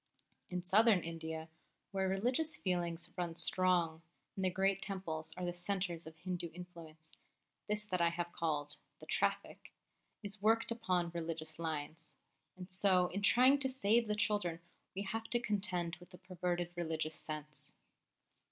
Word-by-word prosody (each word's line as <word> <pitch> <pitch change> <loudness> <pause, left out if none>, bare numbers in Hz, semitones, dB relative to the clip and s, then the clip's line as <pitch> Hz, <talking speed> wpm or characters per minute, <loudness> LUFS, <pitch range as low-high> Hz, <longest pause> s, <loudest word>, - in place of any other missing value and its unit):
In 180 -1 -3
Southern 200 +1 +6
India, 160 -1 -5 0.4
where 190 -1 0
religious 250 +11 +1
feeling 175 -3 0 0.2
runs 170 -2 0
strong, 175 -3 +2 0.3
and 190 - -2
the 185 - +4
great 195 +1 +1
Temples 165 -6 -3
are 180 - -2
the 175 - -1
centres 175 -2 -2
of 160 0 -11
Hindu 175 0 -4
influence, 165 -3 -11 0.6
this 210 0 0
that 185 -4 0
I 170 - +5
have 175 0 -3
called 150 -3 0 0.2
"The - - -12
Traffic" - - -1 0.5
is 205 0 -4
worked 225 +2 +3
upon 185 -7 0
religious 160 -2 -4
lines; 160 0 -4 0.4
and 185 0 -9
so 185 -2 +4
in 200 - -2
trying 255 +7 +6
to 265 -1 +2
save 235 -3 +3
the 210 - +1
children 205 -6 +1 0.4
we 195 - -2
have 225 +3 -3
to 240 - +2
contend 190 -6 -1
with 175 0 -15
the 180 - -12
perverted 180 -1 -2
religious 160 -2 -1
sense. 150 -1 -7
180 Hz, 150 wpm, -36 LUFS, 165-200 Hz, 0.6 s, Southern